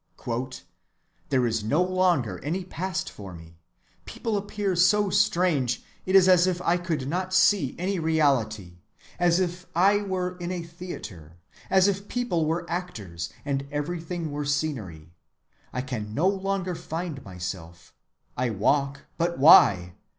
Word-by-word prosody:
—"There 130 Hz, -3 st, +2 dB
is 115 Hz, -2 st, -1 dB
no 145 Hz, +11 st, +2 dB
longer 180 Hz, -9 st, +1 dB
any 175 Hz, +6 st, -2 dB
past 185 Hz, 0 st, -3 dB
for 95 Hz, -4 st, -9 dB
me; 80 Hz, 0 st, -14 dB, 0.5 s
people 225 Hz, -2 st, -3 dB
appear 205 Hz, -1 st, -2 dB
so 195 Hz, +3 st, +4 dB
strange; 150 Hz, -12 st, +2 dB, 0.2 s
it 185 Hz, -, +2 dB
is 190 Hz, -1 st, +7 dB
as 180 Hz, -1 st, +6 dB
if 180 Hz, -1 st, 0 dB
I 175 Hz, -, +3 dB
could 165 Hz, -6 st, -3 dB
not 185 Hz, +4 st, -2 dB
see 185 Hz, -6 st, +3 dB
any 185 Hz, +2 st, -1 dB
reality, 120 Hz, -, 0 dB, 0.4 s
as 175 Hz, 0 st, +3 dB
if 180 Hz, 0 st, -2 dB
I 200 Hz, +4 st, +4 dB
were 185 Hz, -2 st, -3 dB
in 175 Hz, 0 st, -4 dB
a 180 Hz, -2 st, -3 dB
theatre; 115 Hz, -, -9 dB, 0.3 s
as 190 Hz, 0 st, +5 dB
if 200 Hz, 0 st, -1 dB
people 180 Hz, -11 st, -1 dB
were 170 Hz, +2 st, -1 dB
actors, 105 Hz, -, -5 dB, 0.2 s
and 140 Hz, -1 st, -2 dB
everything 165 Hz, +2 st, -3 dB
were 145 Hz, +1 st, -3 dB
scenery; 115 Hz, -, -3 dB, 0.6 s
I 125 Hz, -, -2 dB
can 110 Hz, -5 st, -5 dB
no 165 Hz, +8 st, +2 dB
longer 195 Hz, -1 st, -1 dB
find 165 Hz, -3 st, -5 dB
myself; 90 Hz, -2 st, -8 dB, 0.4 s
I 125 Hz, 0 st, 0 dB
walk, 140 Hz, +7 st, +1 dB, 0.2 s
but 170 Hz, +1 st, 0 dB
why? 100 Hz, -, +7 dB
165 Hz, 145 wpm, -26 LUFS, 125-185 Hz, 0.6 s, is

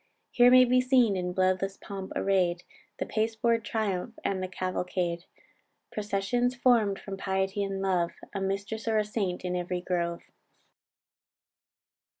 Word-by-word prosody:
Here 245 Hz, 0 st, +6 dB
may 255 Hz, 0 st, +8 dB
be 250 Hz, +1 st, +4 dB
seen 250 Hz, -5 st, +3 dB
in 180 Hz, -1 st, -2 dB
bloodless 185 Hz, +1 st, 0 dB
pomp 195 Hz, -1 st, -7 dB
array'd, 180 Hz, -3 st, +1 dB, 0.3 s
The -, -, -2 dB
pasteboard 225 Hz, +1 st, 0 dB
triumph, 220 Hz, 0 st, -2 dB
and 190 Hz, -1 st, 0 dB
the 185 Hz, -, -2 dB
cavalcade; 180 Hz, -1 st, -2 dB, 0.7 s
Processions 210 Hz, +5 st, 0 dB
form'd 230 Hz, -6 st, +3 dB
from 195 Hz, -1 st, -7 dB
piety 190 Hz, +1 st, -1 dB
and 195 Hz, -1 st, -3 dB
love, 175 Hz, -3 st, +1 dB, 0.2 s
A 200 Hz, -, -3 dB
mistress 200 Hz, +4 st, -3 dB
or 220 Hz, -1 st, +2 dB
a 215 Hz, -, +2 dB
saint 195 Hz, -4 st, -2 dB
in 180 Hz, 0 st, -1 dB
every 180 Hz, 0 st, -2 dB
grove." 170 Hz, -1 st, -2 dB
195 Hz, 140 wpm, -28 LUFS, 185-220 Hz, 0.7 s, may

